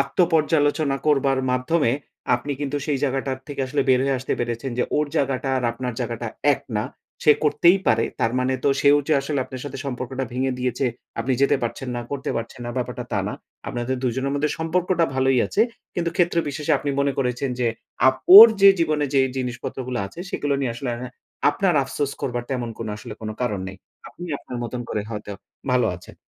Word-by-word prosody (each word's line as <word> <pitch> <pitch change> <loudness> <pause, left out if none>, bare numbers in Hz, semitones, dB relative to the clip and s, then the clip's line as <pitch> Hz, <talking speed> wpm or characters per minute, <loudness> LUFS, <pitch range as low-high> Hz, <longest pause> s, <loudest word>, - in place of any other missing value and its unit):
আত্ম-পর্যালোচনা 155 -2 +2
করবার 135 -2 +3
মাধ্যমে 125 +1 +1 0.4
আপনি 145 +4 -3
কিন্তু 145 0 -2
সেই 145 -3 0
জায়গাটার 135 -1 -1
থেকে 145 -2 -5
আসলে 140 +1 0
বের 125 -1 +5
হয়ে 135 -1 +1
আসতে 130 - -3
পেরেছেন 120 +2 -3
যে - - +3
ওর 150 0 +2
জায়গাটা 135 -1 0
আর 130 - -1
আপনার 125 +1 -4
জায়গাটা 120 -1 -3 0.3
এক - - -2 0.2
না। 105 - 0 0.4
সে 150 - +6
করতেই 170 +5 +5
পারে। 115 -1 +3 0.2
তার 115 +1 +2
মানে 130 +1 +1
তো - - +4
সেও 145 0 +6
যে 155 - +3
আসলে 140 0 -2
আপনার 130 0 -8
সাথে 145 - -6
সম্পর্কটা 130 0 -3
ভেঙে 130 +1 0
দিয়েছে। 125 +1 -1 0.3
আপনি 130 +3 0
যেতে 140 - +4
পারছেন 120 +2 -3
না, - - -2
করতে 135 -1 -3
পারছেন 115 +2 -6
না - - -3
ব্যাপারটা 125 0 -3
তা - - +1
না। - - -4 0.3
আপনাদের 120 +2 -2
দুজনের 130 +3 -1
মধ্যে 150 +1 0
সম্পর্কটা 170 +1 +1
ভালোই 130 -1 +3
আছে। 215 - +2 0.3
কিন্তু 170 -1 -1
ক্ষেত্র 175 -2 +2
বিশেষে 150 +2 -1
আপনি 145 +1 -2
মনে 140 0 +1
করেছেন 125 +1 -1
যে 120 - +2 0.4
আপ 130 - +2 0.2
ওর 225 +3 +14
যে 200 - +10
জীবনে 155 -2 +1
যে 135 - +5 0.2
জিনিসপত্রগুলো 125 0 -4
আছে 135 - -14
সেগুলো 145 -1 -1
নিয়ে 125 -3 -1
আসলে 125 +1 -4 0.6
আপনার 180 +3 +1
আফসোস 135 +1 -2
করবার 120 -2 -2
তেমন 125 -3 -2
কোনো 110 -2 -4
আসলে 105 - -8
কোনো 110 -1 -4
কারণ 105 -6 -1
নেই। 95 - -9 0.3
আপনি 175 - -9
আপনার 125 - -8
মতন 120 +1 -4
করে 105 - -2
হয়তো 105 -1 -6 0.4
ভালো 125 -1 +3
আছেন। 90 - -14
135 Hz, 190 wpm, -23 LUFS, 125-145 Hz, 0.6 s, ওর